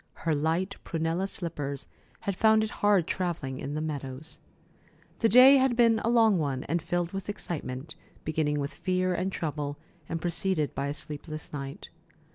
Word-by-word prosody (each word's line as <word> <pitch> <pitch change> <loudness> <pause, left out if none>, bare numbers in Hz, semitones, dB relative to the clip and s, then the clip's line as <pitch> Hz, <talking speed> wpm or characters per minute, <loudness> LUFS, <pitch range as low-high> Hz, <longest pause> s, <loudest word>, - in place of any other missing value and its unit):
Her 165 - +3
light 165 +6 0
prunella 165 +3 -1
slippers 145 -7 -4 0.3
had 200 - -2
found 220 +2 +5
it 220 - -3
hard 205 -5 +4
travelling 160 -9 -2
in 140 +2 -4
the 155 - -1
meadows. 145 -2 -5 0.8
The 225 - +4
day 255 +5 +9
had 260 -2 +3
been 230 -2 +5
a 225 - 0
long 225 -5 +5
one, 135 -4 -1
and 170 +3 -1
filled 175 +1 -1
with 195 0 -5
excitement, 155 -7 -4 0.3
beginning 150 -1 0
with 140 0 -3
fear 185 +1 0
and 185 +2 -1
trouble, 150 -4 -3 0.3
and 165 - -2
preceded 170 -2 0
by 140 - -2
a 145 - -3
sleepless 155 +1 -7
night. 140 -1 -6
165 Hz, 165 wpm, -28 LUFS, 145-195 Hz, 0.8 s, day